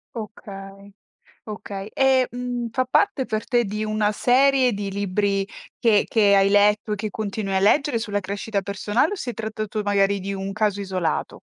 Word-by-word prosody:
Okay, 200 Hz, -2 st, -9 dB, 0.6 s
okay. 205 Hz, -1 st, -6 dB
E, 265 Hz, -1 st, +3 dB
mhmm, 245 Hz, -1 st, -4 dB
fa 255 Hz, +1 st, 0 dB
parte 285 Hz, 0 st, +1 dB
per 215 Hz, -3 st, -3 dB
te 240 Hz, -3 st, +2 dB
di 210 Hz, +2 st, -3 dB
una 215 Hz, -1 st, 0 dB
serie 260 Hz, +1 st, +3 dB
di 200 Hz, -1 st, -3 dB
libri 200 Hz, 0 st, 0 dB, 0.3 s
che 220 Hz, -3 st, +3 dB
che 205 Hz, -3 st, +4 dB
hai 195 Hz, 0 st, +5 dB
letto 210 Hz, +1 st, +3 dB
e -, -, 0 dB
che 210 Hz, +1 st, -4 dB
continui 205 Hz, -1 st, -4 dB
a 190 Hz, -, +3 dB
leggere 235 Hz, +4 st, +3 dB
sulla 205 Hz, -2 st, -2 dB
crescita 200 Hz, +2 st, -3 dB
personale, 205 Hz, -, 0 dB
o -, -, -2 dB
si 250 Hz, -9 st, -4 dB
è -, -, -12 dB
trattato 215 Hz, 0 st, -4 dB
magari 200 Hz, -1 st, +2 dB
di 200 Hz, +1 st, -4 dB
un 195 Hz, 0 st, -4 dB
caso 210 Hz, -2 st, 0 dB
isolato? 185 Hz, -5 st, -2 dB
210 Hz, 175 wpm, -23 LUFS, 200-230 Hz, 0.6 s, hai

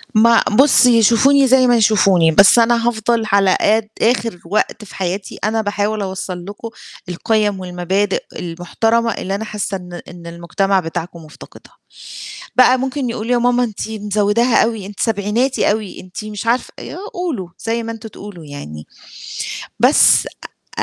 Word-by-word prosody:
مع 230 Hz, +1 st, +5 dB, 0.2 s
بُصّي، 250 Hz, -4 st, +5 dB
يشوفوني 265 Hz, +5 st, +4 dB
زي 255 Hz, 0 st, +4 dB
ما 245 Hz, -, +4 dB
يشوفوني، 195 Hz, -6 st, +3 dB
بس 200 Hz, +7 st, +6 dB
أنا 235 Hz, 0 st, +2 dB
هافضل 235 Hz, 0 st, 0 dB
على 195 Hz, -2 st, +3 dB
قد 215 Hz, +1 st, +2 dB
آخِر 230 Hz, -4 st, 0 dB
وقت 215 Hz, +4 st, -2 dB
في -, -, -14 dB
حياتي 190 Hz, +1 st, -4 dB
أنا 220 Hz, +1 st, 0 dB
باحاول 205 Hz, +1 st, -2 dB
أوصّل 190 Hz, -2 st, -5 dB
لكم 205 Hz, +3 st, -8 dB, 0.4 s
القِيَم 205 Hz, +2 st, 0 dB
والمبادئ 185 Hz, +2 st, -2 dB
المحترمة 225 Hz, +7 st, -1 dB
اللي 195 Hz, +1 st, -4 dB
أنا 220 Hz, -, -5 dB
حاسّة 205 Hz, -2 st, -4 dB
إن 180 Hz, -1 st, -10 dB
إن 175 Hz, -1 st, -11 dB
المجتمع 180 Hz, +3 st, -1 dB
بتاعكم 165 Hz, 0 st, -6 dB
مُفتقدها. 150 Hz, -, -15 dB, 0.8 s
بقى 255 Hz, 0 st, +5 dB
ممكن 265 Hz, 0 st, -3 dB
يقولوا: 230 Hz, +1 st, -4 dB
"يا 245 Hz, -, +3 dB
ماما 245 Hz, +1 st, +2 dB
أنتِ 220 Hz, -1 st, -5 dB
مزوِّداها 210 Hz, +2 st, +1 dB
أوي، 220 Hz, -4 st, -3 dB
أنتِ 200 Hz, 0 st, -11 dB
سبعيناتي 225 Hz, +5 st, 0 dB
أوي، 210 Hz, -2 st, -4 dB
أنتِ 185 Hz, +3 st, -9 dB
مش 210 Hz, 0 st, -7 dB
عارفة" 235 Hz, +2 st, -1 dB
يا -, -, -8 dB, 0.2 s
قولوا 315 Hz, -, -4 dB
زي 230 Hz, +1 st, -2 dB
ما 230 Hz, -, -5 dB
أنتم 225 Hz, 0 st, -9 dB
تقولوا 200 Hz, -6 st, -11 dB
يعني. 75 Hz, -, -9 dB, 0.9 s
بس -, -, +5 dB, 0.5 s
أ -, -, +1 dB
210 Hz, 155 wpm, -17 LUFS, 190-230 Hz, 0.9 s, بس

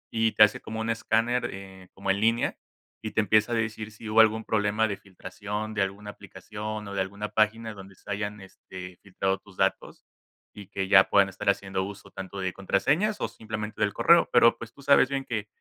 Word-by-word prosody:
y 110 Hz, -1 st, +2 dB
te 105 Hz, -, +7 dB
hace 105 Hz, -, +3 dB
como 110 Hz, -, -6 dB
un 110 Hz, -, -3 dB
escáner, 115 Hz, +2 st, 0 dB
eh, 95 Hz, -1 st, -11 dB
como 95 Hz, 0 st, -1 dB
en 100 Hz, +1 st, -1 dB
línea 115 Hz, +2 st, +2 dB, 0.5 s
y 110 Hz, -, -4 dB
te -, -, 0 dB
empieza 110 Hz, +2 st, +3 dB
a -, -, +1 dB
decir 110 Hz, -1 st, -3 dB
si 105 Hz, +1 st, -11 dB
hubo 110 Hz, +1 st, +3 dB
algún 110 Hz, 0 st, +2 dB
problema 105 Hz, +1 st, +1 dB
de 100 Hz, -, -3 dB
filtración 100 Hz, +2 st, -6 dB
de 105 Hz, -, -1 dB
alguna 100 Hz, +2 st, -3 dB
aplicación 105 Hz, +2 st, -7 dB
o 100 Hz, -, -7 dB
de 100 Hz, -, 0 dB
alguna 100 Hz, +2 st, -4 dB
página 110 Hz, +1 st, 0 dB
donde 95 Hz, -1 st, -12 dB
se -, -, -17 dB
hayan, 105 Hz, +1 st, -3 dB
este, 90 Hz, -1 st, -11 dB
filtrado 95 Hz, 0 st, -2 dB
tus 95 Hz, -1 st, -19 dB
datos -, -, -1 dB, 0.5 s
y 100 Hz, -2 st, -11 dB
que 95 Hz, -1 st, -3 dB
ya 95 Hz, -1 st, +7 dB
puedan 100 Hz, -1 st, +4 dB
estar 95 Hz, +1 st, -2 dB
haciendo 95 Hz, -1 st, -1 dB
uso 100 Hz, +1 st, -9 dB
tanto 95 Hz, +1 st, -7 dB
de 95 Hz, -1 st, -2 dB
contraseñas 145 Hz, -, +1 dB
o -, -, 0 dB
simplemente 110 Hz, -1 st, -6 dB
del 105 Hz, -1 st, +2 dB
correo. 170 Hz, +9 st, +5 dB
Pero 115 Hz, -1 st, +6 dB
pues 115 Hz, -1 st, -9 dB
tú 140 Hz, -, -16 dB
sabes 135 Hz, -1 st, +5 dB
bien 135 Hz, -1 st, -2 dB
que 105 Hz, -3 st, -3 dB
105 Hz, 210 wpm, -27 LUFS, 95-110 Hz, 0.5 s, te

